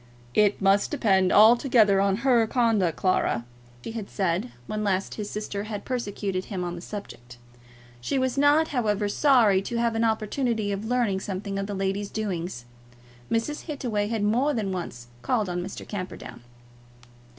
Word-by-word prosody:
"It 205 -1 +3
must 195 +1 +3
depend 195 -10 +2
altogether 220 -2 +5
on 200 +5 0
her 235 -4 +4
conduct, 220 -9 +1
Clara," 155 -10 +1 0.4
he - - -5
had 225 -3 -6
said 190 +4 -1
when 215 +8 -3
last 195 -2 0
his 210 -1 -5
sister 205 -1 -4
had 210 -2 -6
persecuted 205 -6 -3
him 190 -4 -4
on 175 -1 -3
the 175 - -7
subject. 125 - -9 0.6
She 120 - -2
was 260 -1 0
not, 290 +3 +4
however, 210 -6 0
sorry 220 -5 +4
to 235 +4 -5
have 235 -1 +1
an 225 +1 0
opportunity 220 0 0
of 200 +2 -3
learning 230 -5 +1
something 195 +1 -4
of 195 - -3
the 205 - -4
lady's 195 +1 -2
doings. 180 - -4 0.6
Mr. 230 +7 -1
Hittaway 240 -9 -2
had 220 -1 -2
more 250 +8 +2
than 205 -4 -2
once 170 -10 -5 0.2
called 220 - 0
on 180 0 -2
Mr. 190 +2 -7
Camperdown. 185 - -7
205 Hz, 160 wpm, -26 LUFS, 195-235 Hz, 0.6 s, altogether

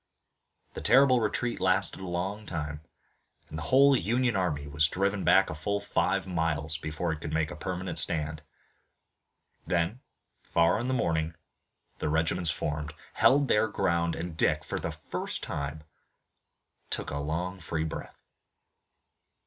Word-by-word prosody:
The - - -6
terrible 130 -1 +6
retreat 120 +1 -1
lasted 95 0 +1
a 95 - -6
long 95 +4 -3
time, 75 -2 -4 0.7
and 80 - -6
the 75 - -6
whole 140 +1 +6
Union 120 +2 +1
army 80 -7 0
was 70 +2 +3
driven 100 +3 0
back - - +5
a - - -4
full 100 +7 -1
five 100 - 0
miles 80 -3 0
before 80 +2 -2
it 80 -1 -5
could 75 - -5
make 80 0 0
a - - -6
permanent 90 +3 -3
stand. 75 -2 -1 1.3
Then, 85 +7 0 0.4
far 85 +4 +2
in 120 - -2
the 130 - +1
morning, 80 -6 0 0.6
the - - -1
regiments 80 +1 +2
reformed, 75 +1 -3 0.2
held 140 +1 +4
their 110 -1 +3
ground, 85 -5 0
and 85 -1 -5
Dick, 75 -1 +2
for - - -3
the - - -3
first - - -5
time, 70 +2 -4 1.1
took - - -3
a 70 - -2
long 85 +5 -3
free 80 -2 -2
breath. 80 - -7
85 Hz, 150 wpm, -29 LUFS, 75-100 Hz, 1.3 s, terrible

